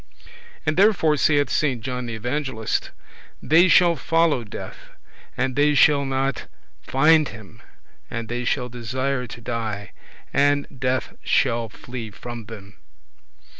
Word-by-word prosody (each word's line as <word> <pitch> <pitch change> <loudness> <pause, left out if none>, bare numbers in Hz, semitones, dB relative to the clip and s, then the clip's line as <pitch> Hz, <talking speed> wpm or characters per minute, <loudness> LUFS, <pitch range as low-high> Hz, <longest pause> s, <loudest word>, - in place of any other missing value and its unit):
And 155 +1 0
therefore 190 -6 +4
saith 145 -1 +2
Saint 135 -6 0
John 125 -1 -4
the 115 - -4
Evangelist, 125 -1 -2 0.5
"They 165 +4 +5
shall 175 -1 +5
follow 165 -6 +1
death, 105 - -10 0.4
and 130 0 -1
they 145 +1 +3
shall 145 0 +5
not 135 +1 -2 0.3
find 155 +3 +4
him, 110 +1 -13 0.5
and 115 -1 -5
they 120 +1 -3
shall 125 0 -1
desire 125 +2 -3
to 120 - -10
die, 110 -4 -4 0.4
and 145 0 +3
death 130 0 -1
shall 115 -3 +1
flee 120 0 -8
from 120 +1 -8
them." 100 -3 -11
130 Hz, 130 wpm, -23 LUFS, 115-145 Hz, 0.5 s, They